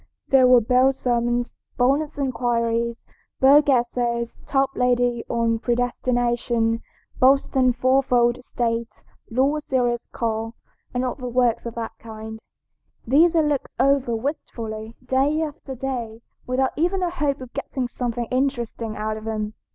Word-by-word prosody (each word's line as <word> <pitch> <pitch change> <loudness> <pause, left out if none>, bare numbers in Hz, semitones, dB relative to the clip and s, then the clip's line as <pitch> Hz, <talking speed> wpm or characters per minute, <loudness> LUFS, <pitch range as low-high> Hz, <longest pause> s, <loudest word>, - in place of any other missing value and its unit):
There 260 -2 +6
were 250 -1 +7
Bell's 255 +4 +3
Sermons, 240 -1 0 0.2
Bonnett's 285 +5 +1
Inquiries, 235 -3 -1 0.3
Bogue's 285 +2 +6
Essays, 240 -2 0
Toplady 250 -3 +1
on 230 -1 +1
Predestination, 240 -1 0 0.4
Boston's 260 -1 +4
Fourfold 250 -1 +2
State, 230 -2 -3 0.3
Law's 275 +5 +1
Serious 245 -3 0
Call, 225 0 -2 0.4
and 250 +1 -1
other 255 0 -4
works 245 -1 +1
of 230 - -7
that 230 -1 -4
kind. 220 0 -8 0.7
These 320 +8 +4
I 325 - +5
looked 295 -3 -1
over 270 -2 +2
wistfully, 225 -4 -5
day 270 +4 +2
after 295 -3 -6
day, 235 -3 -5 0.2
without 260 +1 +1
even 360 +4 0
a 350 - 0
hope 295 -5 -1
of 255 -2 -10
getting 255 -2 -3
something 240 -1 -3
interesting 240 -4 -2
out 215 0 -2
of 215 - -9
them. 215 -1 -3
245 Hz, 130 wpm, -23 LUFS, 235-270 Hz, 0.7 s, were